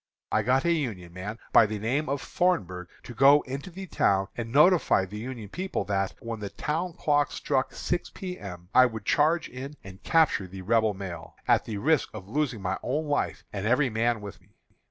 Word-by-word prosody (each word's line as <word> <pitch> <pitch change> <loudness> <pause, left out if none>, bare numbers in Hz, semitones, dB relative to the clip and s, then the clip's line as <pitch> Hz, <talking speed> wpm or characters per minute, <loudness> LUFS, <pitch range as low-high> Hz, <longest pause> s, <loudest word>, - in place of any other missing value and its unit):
I 110 - +3
got 130 +6 +2
a 170 - +3
Union 110 - -2
man, 100 +5 -6 0.2
by 110 - +7
the 110 0 -3
name 130 +8 -1
of 140 0 -2
Thornburgh, 95 - 0 0.2
to 120 - -9
go 140 +5 +6
into 135 +6 -6
the 190 +2 -8
town 95 - +1
and 115 -1 -5
notify 150 - +5
the 105 +3 -8
Union 120 -2 -6
people 185 - -3
that, 100 -1 -1
when 115 -1 -5
the 100 -1 -5
town 165 - -2
clock 145 -3 +1
struck 135 -2 -1
six 175 - -2
P. 180 -1 -7
M., 90 -3 -9
I 130 0 +7
would 110 -3 -7
charge 155 +2 +2
in 135 +4 -8
and 95 0 -11
capture 160 - +2
the 95 +1 -9
Rebel 110 0 +2
mail, 90 -4 -7
at - - +3
the 110 -3 -4
risk 150 +6 +2
of 95 -3 -8
losing 125 -3 -1
my 95 +1 -1
own 150 +5 -1
life 145 -1 -1
and 100 0 -2
every 125 +2 +3
man 115 0 +1
with 100 -3 -9
me. 95 +3 -28
115 Hz, 205 wpm, -27 LUFS, 100-145 Hz, 0.2 s, by